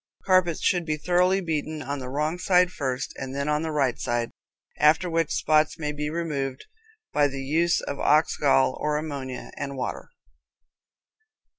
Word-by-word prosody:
Carpets 185 -3 +3
should 175 -2 +2
be 155 -2 -2
thoroughly 180 +4 +2
beaten 155 -2 -3
on 140 +2 -4
the 130 -1 -6
wrong 150 +5 -1
side 180 -1 +3
first 130 -5 -3
and 130 +1 -6
then 140 +1 -2
on 150 0 +1
the 160 - -2
right 140 -5 0
side, 120 -1 -1 0.5
after 155 +4 +4
which 165 -2 0
spots 155 +1 +2
may 150 -3 -2
be 150 0 -3
removed 150 -5 -3 0.5
by 145 -1 +4
the 135 -1 -5
use 165 +5 +2
of 140 - -5
ox 155 +2 +3
gall 135 -2 +3
or 150 0 0
ammonia 140 -4 -5
and 140 -1 -5
water. 125 - -4
150 Hz, 165 wpm, -25 LUFS, 140-165 Hz, 0.5 s, after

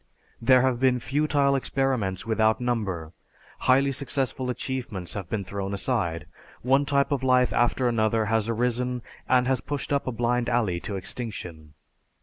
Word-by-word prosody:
There 130 +1 +5
have 130 -2 +1
been 130 -1 +3
futile 140 +1 +1
experiments 125 -8 -1
without 110 -1 +2
number; 100 -10 -2 0.5
highly 135 +2 +3
successful 135 -1 -2
achievements 125 -8 -4
have 95 -4 -6
been 105 -3 -2
thrown 100 +1 -4
aside; 95 - -1 0.4
one 135 +3 +3
type 140 0 +2
of 140 -2 0
life 125 -1 +3
after 120 +1 +2
another 110 -1 +1
has 110 +1 0
arisen 125 +1 -1 0.3
and 125 -1 +4
has 130 -1 +1
pushed 145 0 -3
up 140 - 0
a - - 0
blind 120 +1 0
alley 110 -8 +1
to 100 - -5
extinction. 90 -7 -6
120 Hz, 150 wpm, -26 LUFS, 105-130 Hz, 0.5 s, There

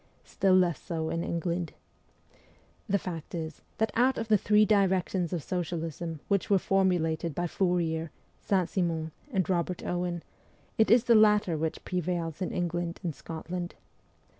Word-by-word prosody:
Still 190 -1 +2
less 175 -6 +3
so 160 -3 -3
in 165 - -1
England. 170 0 -2 1.2
The 200 - +3
fact 175 -4 -6
is, 160 -2 -5 0.2
that 220 -1 +1
out 255 +3 +3
of 225 0 -3
the 215 - +6
three 210 +2 +4
directions 190 -4 +2
of 170 -5 -2
socialism 165 -2 -3
which 200 -3 +1
were 200 - +5
formulated 175 -5 +1
by 175 - -1
Fourier, 170 -3 0 0.3
Saint 185 -4 +1
Simon, 165 -4 -1 0.2
and 190 -6 +1
Kobert 180 0 -1
Owen, 175 -1 -2 0.6
it 220 - +5
is 235 +1 +6
the 240 - +4
latter 210 -5 +5
which 160 +1 -3
prevails 175 -2 -2
in 185 - -1
England 175 0 -2
and 170 -3 -2
Scotland. 175 +4 -6
175 Hz, 150 wpm, -29 LUFS, 165-195 Hz, 1.2 s, the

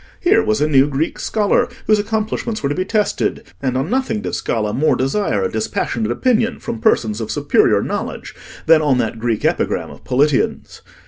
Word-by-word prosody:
Here 410 +5 +3
was 215 - 0
a 150 - +3
new 140 -2 +4
Greek 145 +3 -2
scholar 220 +3 +1 0.2
whose 215 -1 +3
accomplishments 220 0 -2
were 140 - +1
to - - 0
be 185 +4 -2
tested, 210 0 -1 0.2
and 130 -2 -1
on 135 +9 -2
nothing 255 -4 0
did - - -5
Scala 105 -2 -1
more 155 +3 +2
desire 130 - 0
a 95 - -1
dispassionate 110 +1 -2
opinion 230 - +1
from 115 - -6
persons 110 -1 +1
of 110 - -5
superior - - +2
knowledge - - -5 0.3
than 160 -1 +6
on 145 -4 +2
that 115 -1 -2
Greek 115 -2 -1
epigram - - 0
of 70 - -14
Politian's. 140 +2 0
150 Hz, 185 wpm, -18 LUFS, -, 0.3 s, than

